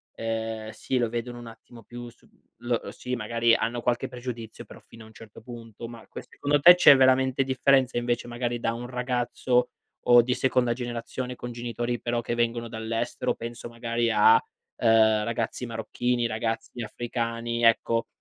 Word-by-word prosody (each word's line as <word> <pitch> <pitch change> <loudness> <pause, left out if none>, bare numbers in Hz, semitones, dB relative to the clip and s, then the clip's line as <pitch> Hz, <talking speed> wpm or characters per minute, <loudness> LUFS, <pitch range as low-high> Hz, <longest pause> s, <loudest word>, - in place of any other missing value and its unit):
ehm, 110 -1 -4
sì, 130 - -3
lo 120 -2 +1
vedono 120 +1 -5
un 120 - -10
attimo 115 0 -14
più 120 +1 -9
su - - -23
l 120 - -18
lo 120 -2 -1
sì, 125 0 -5
magari 115 +1 +1
hanno 120 +1 -2
qualche 120 0 0
pregiudizio, 120 -3 -7
però - - -13
fino 115 -1 -15
a - - -14
un 110 - -17
certo 110 0 -14
punto. 115 -1 -10
Ma 115 -1 -12
que - - -9
secondo 145 0 0
te, 175 +5 +9
c'è 145 -5 +8
veramente 130 0 +3
differenza 130 -1 +2
invece 120 0 -1
magari 120 0 -3
da 115 - -1
un 120 +1 -6
ragazzo, 125 0 0 0.4
o 120 0 +8
di 125 +2 -1
seconda 125 -2 +1
generazione 125 +1 -5
con 120 0 -7
genitori 120 0 -3
però 120 0 -1
che 120 - -3
vengono 115 0 -1
dall'estero? 115 +1 -2
Penso 120 0 -7
magari 115 0 -1
a, 110 +1 +6 0.4
ehm, 110 -1 +4
ragazzi 115 +2 -3
marocchini, 120 +1 -2
ragazzi 115 +2 -4
africani, 115 +1 -3
ecco. 115 0 +3
120 Hz, 170 wpm, -26 LUFS, 115-125 Hz, 0.4 s, te